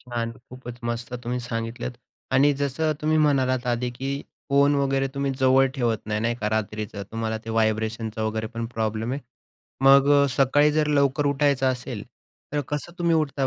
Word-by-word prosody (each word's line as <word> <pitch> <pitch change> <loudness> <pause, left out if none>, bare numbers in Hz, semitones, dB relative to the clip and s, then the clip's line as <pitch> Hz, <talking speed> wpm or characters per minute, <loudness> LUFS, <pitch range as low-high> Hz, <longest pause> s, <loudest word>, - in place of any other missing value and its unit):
छान. 120 -2 -4 0.2
खूपच 125 -1 -9
मस्त 120 +1 -4
तुम्ही 125 +1 -2
सांगितलंत 115 0 -4 0.4
आणि 145 +2 +5
जसं 145 +3 0
तुम्ही 155 +1 +2
म्हणालात 130 -4 +2
आधी, 120 0 0
की 135 +3 -4 0.3
फोन 140 +1 +4
वगैरे 135 -1 +1
तुम्ही 140 0 -1
जवळ 130 +1 +5
ठेवत 120 -4 0
नाही, 105 0 -1
नाही 115 +1 0
का 105 - 0
रात्रीचं. 105 -1 -3
तुम्हाला 110 0 -2
ते 115 - -5
व्हायब्रेशनचं 110 0 -1
वगैरे 110 0 -2
पण 115 +1 -5
प्रॉब्लेम 110 +1 -1
आहे. 140 - -3 0.6
मग 140 +1 +7
अ, - - +3
सकाळी 145 +2 +4
जर 155 0 +2
लवकर 140 0 +2
उठायचं 140 -2 +2
असेल 120 -4 -6 0.5
तर 145 - +1
कसं 150 +3 -4
तुम्ही 170 -1 +2
उठता 140 -3 0
130 Hz, 170 wpm, -24 LUFS, 115-140 Hz, 0.6 s, मग